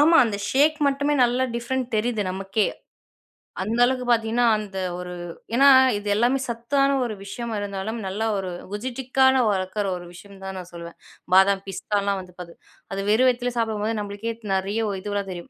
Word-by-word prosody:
ஆமா 325 +3 +6
அந்த 215 -3 -2
ஷேக் 300 +3 +3
மட்டுமே 285 +1 +1
நல்லா 245 +2 +1
டிஃபரண்ட் 255 +2 -2
தெரியுது 220 0 0
நமக்கே. 195 +2 0 1.0
அந்த 220 +5 -1
அளவுக்கு 255 0 -1
பாத்தீங்கன்னா, 230 +1 +2
அந்த 205 -2 -7 0.2
ஒரு 180 0 -6 0.4
ஏன்னா 275 +3 +6 0.3
இது 205 0 -7
எல்லாமே 240 +5 +2
சத்தான 275 +4 +1
ஒரு 225 - -3
விஷயமா 230 +3 -5
இருந்தாலும். 200 +2 -4
நல்லா 205 +4 -2
ஒரு 190 -1 -3 0.2
குஜிட்டிக்கான 260 +4 +1
வளர்க்கிற 195 +1 -1
ஒரு 175 - -10
விஷயம் 195 +2 -14
தான் 190 0 -5
நான் 180 -1 -10
சொல்லுவேன். 170 0 -9 0.4
பாதாம், 195 +1 +5
பிஸ்தாலாம் 200 +1 -1
வந்து 180 -1 -14
பாத் 170 -1 -8 0.4
அது 195 - -2
வெறும் 240 +5 +4
வயித்துலே 245 0 -1
சாப்டும்போது 220 -1 -1
நம்மளுக்கே 205 +3 -4 0.2
நெறைய 195 +3 -1 0.2
இதுவெல்லாம் 205 -1 -3
தெரியும். 175 -1 -8
215 Hz, 160 wpm, -24 LUFS, 195-245 Hz, 1.0 s, ஆமா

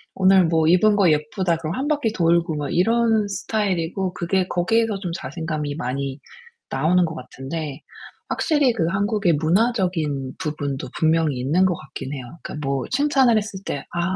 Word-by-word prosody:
"오늘 190 -1 +5
뭐 160 -1 +2
입은 195 +5 +5
거 195 -4 +5
예쁘다." 165 +4 0
그럼 165 +1 -4
1 270 +4 -2
바퀴 290 -7 +1
돌고 170 -4 +2
막 145 -2 -3
이런 225 +3 +3
스타일이고 190 -3 -1
그게 180 +2 0
거기에서 220 +3 +1
좀 180 -3 -4
자신감이 155 -5 -4
많이 135 +1 -3 0.5
나오는 170 +6 +2
것 160 0 -5
같은데 140 +2 -6 0.5
확실히 290 -6 +2
그 205 -8 0
한국의 200 -1 +1
문화적인 165 - 0
부분도 145 -3 -3
분명히 160 -3 +2
있는 150 +9 +2
것 180 - +1
같긴 135 -1 -8
해요. 130 -3 -6 0.2
그러니까 150 -2 -5
뭐 135 -1 0
칭찬을 265 -4 +3
했을 205 -2 -3
때 140 - -4
"아, 175 +2 -1
175 Hz, 335 characters per minute, -22 LUFS, 150-205 Hz, 0.5 s, 오늘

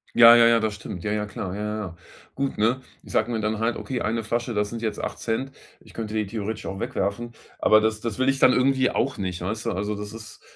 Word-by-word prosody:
Ja, 115 0 +10
ja, 115 - +7
ja, 115 0 +5
das 110 -2 -1
stimmt. 90 -3 -8
Ja, 105 - -1
ja, 105 0 -1
klar. 95 -2 -5
Ja, 105 - -4
ja, 105 0 -2
ja. 85 -1 -9 0.4
Gut, 140 0 -2
ne? 115 +5 +2 0.2
Ich - - -12
sage 110 +2 +2
mir 115 - -1
dann 110 0 -1
halt: 115 +1 0
„Okay, 130 -2 -4
1 115 +1 -1
Flasche, 120 +2 -2
das 105 -1 0
sind 115 0 -6
jetzt 110 -2 -2
8ct.“ 120 +4 -3 0.3
Ich - - -18
könnte 110 -2 -5
die 110 -1 0
theoretisch 110 +1 -4
auch 95 0 -5
wegwerfen. 110 +6 -2 0.3
Aber 110 - +6
das 110 0 0
das 115 -1 -4
will 130 - +2
ich 135 0 +1
dann 130 - +7
irgendwie 130 0 +3
auch 135 +1 -1
nicht, 90 -2 -3
weißt 110 +5 -3
du. - - +1
Also, 105 +3 -2
das 105 0 -6
ist 110 -1 -11
110 Hz, 255 wpm, -25 LUFS, 105-120 Hz, 0.4 s, Ja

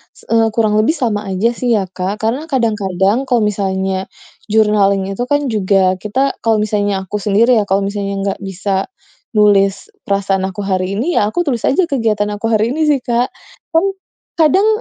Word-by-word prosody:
s - - -19
eee, 225 -1 +4
kurang 215 -2 +2
lebih 275 +10 +2
sama 215 -6 -2
aja 195 +5 +1
sih 240 0 0
ya, 200 - +1
Kak, 185 +2 -2
karena 260 +8 -1
kadang-kadang 215 - 0
kalau 245 -4 +2
misalnya 190 -2 -1 0.4
journaling 210 -2 +3
itu 240 +5 -3
kan, 290 -1 0
juga 190 -3 +2
kita 210 +6 -3 0.2
kalau 225 -2 +1
misalnya 205 -2 -1
aku 205 +3 -4
sendiri 220 +4 +3
ya, - - +1
kalau 195 +1 +1
misalnya 200 0 -3
nggak 195 - -2
bisa 195 0 -2 0.5
nulis 200 -2 +3 0.2
perasaan 195 -1 0
aku 195 +2 -6
hari 190 0 -1
ini 315 +10 -1
ya 205 - +2
aku 350 +10 -1
tulis 245 -6 -1
aja 355 +7 +3
kegiatan 220 -7 0
aku 205 +2 -3
hari 225 +1 +1
ini 310 +1 0
sih, 290 -3 +3
Kak. 240 +1 +1 0.5
Kan, 330 +4 +4 0.5
kadang, 330 +7 +4
210 Hz, 180 wpm, -16 LUFS, 195-235 Hz, 0.5 s, eee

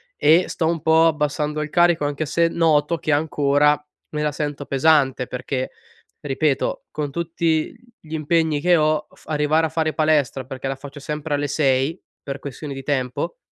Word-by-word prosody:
e 165 +4 +4
sto 160 - -1
un 165 -1 -1
po' 160 +1 +5
abbassando 150 -1 -1
il 150 - -4
carico, 175 -2 +3
anche 145 +2 -2
se 170 +3 +2
noto, 165 -1 +2
che 155 - -1
ancora 145 -1 +2 0.3
me 150 - -3
la 150 0 0
sento 145 -1 -4
pesante 135 -2 +2
perché, 130 +1 -4 0.5
ripeto, 140 0 -1
con 150 -2 -3
tutti 165 0 -1 0.3
gli 155 0 -12
impegni 160 0 +1
che 175 +2 +4
ho, 155 -1 +1
f - - -21
arrivare 155 +1 +2
a - - -2
fare 155 0 -1
palestra, 150 -4 +1
perché 130 +1 -6
la 135 - -2
faccio 140 +1 -10
sempre 150 +1 -4
alle 145 0 -1
6, 140 +3 +1 0.2
per 140 0 -6
questioni 140 +1 -7
di 135 0 -7
tempo, 130 - -2
150 Hz, 175 wpm, -22 LUFS, 140-160 Hz, 0.5 s, po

